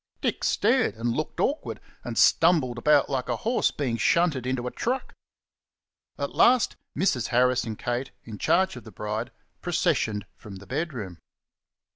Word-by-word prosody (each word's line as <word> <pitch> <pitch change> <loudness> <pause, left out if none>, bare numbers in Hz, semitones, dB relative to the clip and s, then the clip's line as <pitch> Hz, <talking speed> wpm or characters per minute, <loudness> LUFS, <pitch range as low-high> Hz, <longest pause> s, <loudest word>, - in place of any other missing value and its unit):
Dick - - -2
stared 245 - +2
and 115 +1 -1
looked 155 +6 -3
awkward, 290 - -1 0.2
and - - -5
stumbled 150 -8 +4
about 150 +2 +4
like 130 -2 -2
a - - +1
horse 235 +3 +1
being 125 -5 -2
shunted 145 -1 +2
in 130 +1 0
a 125 0 -4
truck. 255 +2 -3 1.0
At - - -3
last 250 -1 +4 0.2
Mrs. 125 - +1
Harris 125 +1 +2
and 110 -2 -5
Kate, 120 +2 -3
in 110 -3 -9
charge 190 -5 +2
of 125 - -9
the 110 - -12
bride, 105 +4 -4 0.3
processioned 155 - 0
from 100 -2 -11
the 95 +1 -11
bedroom. 125 - -4
125 Hz, 155 wpm, -26 LUFS, 115-170 Hz, 1.0 s, stumbled